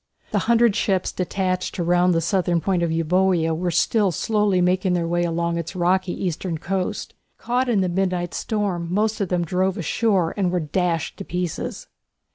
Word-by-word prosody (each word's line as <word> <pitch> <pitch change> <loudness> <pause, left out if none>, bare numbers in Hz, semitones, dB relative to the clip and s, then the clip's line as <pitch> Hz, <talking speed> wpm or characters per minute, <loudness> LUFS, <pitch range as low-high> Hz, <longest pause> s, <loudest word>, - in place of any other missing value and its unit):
The - - +2
hundred 235 -2 +4
ships 190 -4 0
detached 185 0 -2
to 175 - -1
round 175 +1 +3
the 165 - +2
south 180 +2 0
point 185 -3 +1
of 170 - +1
Euboea 165 0 +2
were 175 +2 -1
still 200 +3 +2
slowly 210 +2 +1
making 180 +1 +2
their 170 -2 0
way 175 +1 +1
along 170 0 -1
its 165 +1 -6
rocky 185 +1 0
eastern 175 -1 -2
coast. 185 +3 -3 0.2
Caught 250 +1 -1
in 215 -5 +2
the 185 - +1
midnight 180 -1 -1
storm 200 -6 -2
most 215 +3 0
of 195 - -1
them 175 -1 0
drove 185 +3 0
ashore 190 0 +1
and 195 -3 +1
were 180 - +1
dashed 165 0 -1
to - - -6
pieces. 180 -3 -4
180 Hz, 180 wpm, -22 LUFS, 170-195 Hz, 0.2 s, hundred